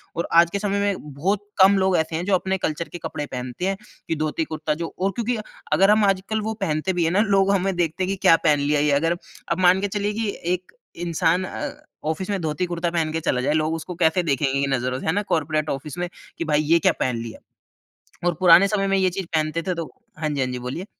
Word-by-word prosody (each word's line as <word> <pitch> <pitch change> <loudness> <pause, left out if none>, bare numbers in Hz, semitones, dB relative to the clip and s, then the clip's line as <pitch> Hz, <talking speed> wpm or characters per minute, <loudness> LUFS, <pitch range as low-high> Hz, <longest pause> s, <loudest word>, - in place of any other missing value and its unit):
और 170 - -2
आज 170 0 +6
के 200 - -1
समय 200 -1 -1
में 185 -8 -2
बहुत, 195 +8 -1
कम 195 +1 +7
लोग 190 -1 +2
ऐसे 160 0 -1
हैं 175 +2 -2
जो 200 -2 +3
अपने 190 +1 -1
कल्चर 165 -1 -3
के 175 - -7
कपड़े 150 - -4
पहनते 125 +8 -4
हैं 195 0 -1 0.3
कि 165 - +1
धोती 155 +1 -1
कुर्ता 155 -1 -1
जो - - -6
और 195 +1 +1
क्योंकि 235 +3 -2 0.4
अगर 195 +2 +5
हम 215 -1 +4
आजकल 195 +3 0
वो 220 +1 -2
पहनते 155 +4 0
भी 175 -1 +1
हैं 165 - +1
ना 200 +3 +3
लोग 195 -2 +3
हमें 195 -1 +1
देखते 175 +1 -1
हैं - - -1
कि 195 - 0
क्या 165 - +9
पहन 150 -2 +4
लिया 145 +1 +1
ये। 150 0 +2
अगर 165 +4 +2 0.3
अब 170 +2 0
मान 185 +2 +5
के 205 - 0
चलिए 205 +1 -2
कि 220 -1 -1 0.2
एक 180 0 -5 0.3
इंसान 170 +1 +1
अ, - - -4 0.4
ऑफिस 160 +5 -2
में 200 -2 0
धोती 160 +3 -1
कुर्ता 170 0 -1
पहन 160 -2 0
के 160 - 0
चला 125 -4 0
जाए, 145 +3 +1
लोग 155 +1 +1
उसको 170 +2 -6
कैसे 170 +1 +2
देखेंगे 140 -2 0
कि 140 - +1
नज़रों 130 +1 -2
से - - -8
है - - +4
ना 205 - +1
कॉर्पोरेट 155 -1 0
ऑफिस 150 +4 -5
में 175 0 -1 0.3
कि 165 - -1
भाई 150 -1 +2
ये 165 +3 +3
क्या - - +4
पहन 125 -2 0
लिया? 115 - -8 0.9
और 175 - +2
पुराने 180 +2 +7
समय 195 -1 0
में 195 0 +2
ये 190 -1 +3
चीज़ 190 0 -4
पहनते 155 +2 0
थे 180 - 0
तो 165 -1 -3 0.3
हाँ 155 -1 -1
जी, 145 -2 -1
हाँ 130 - +1
जी, 125 - -4
बोलिए। 130 +10 -5
170 Hz, 255 wpm, -23 LUFS, 155-195 Hz, 0.9 s, क्या